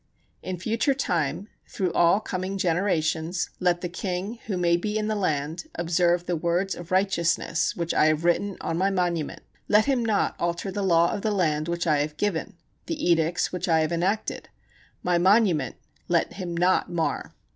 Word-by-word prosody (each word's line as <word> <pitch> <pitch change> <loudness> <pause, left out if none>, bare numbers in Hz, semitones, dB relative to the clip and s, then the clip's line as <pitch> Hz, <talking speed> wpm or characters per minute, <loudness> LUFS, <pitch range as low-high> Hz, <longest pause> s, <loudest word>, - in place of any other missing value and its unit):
In 185 -1 -4
future 225 - 0
time, 170 - -1 0.2
through 185 -5 -2
all 170 +4 +4
coming 190 -2 -4
generations, 170 -2 0
let 175 -1 +1
the 180 - -2
king, 185 +5 -4
who 195 -4 -1
may 170 -1 +3
be 210 +5 -2
in 215 0 -1
the 215 - 0
land, 160 -3 -1
observe 175 +1 +1
the 175 - -1
words 175 +4 0
of 175 -1 -9
righteousness 180 -4 +1
which 170 -1 -2
I - - +4
have 155 +1 +1
written 190 +3 +1
on 165 - -2
my 195 +1 +3
monument; 175 -5 -1 0.2
let 210 +1 +4
him 265 -4 +1
not 220 -3 +1
alter 170 +3 -2
the 205 +2 -3
law 170 -3 +3
of 205 - -3
the 220 - 0
land 155 -6 0
which 170 0 -2
I 155 -3 +3
have 150 +1 -2
given, 200 -6 -2 0.3
the 305 - 0
edicts 165 +1 +1
which 180 0 -2
I 160 -1 +4
have 155 +1 0
enacted; 185 +6 -1 0.5
my 175 -1 +2
monument 185 - +3 0.3
let - - +1
him 175 -3 -5
not 180 +2 +2
mar. 165 -2 -2
175 Hz, 180 wpm, -25 LUFS, 170-195 Hz, 0.5 s, all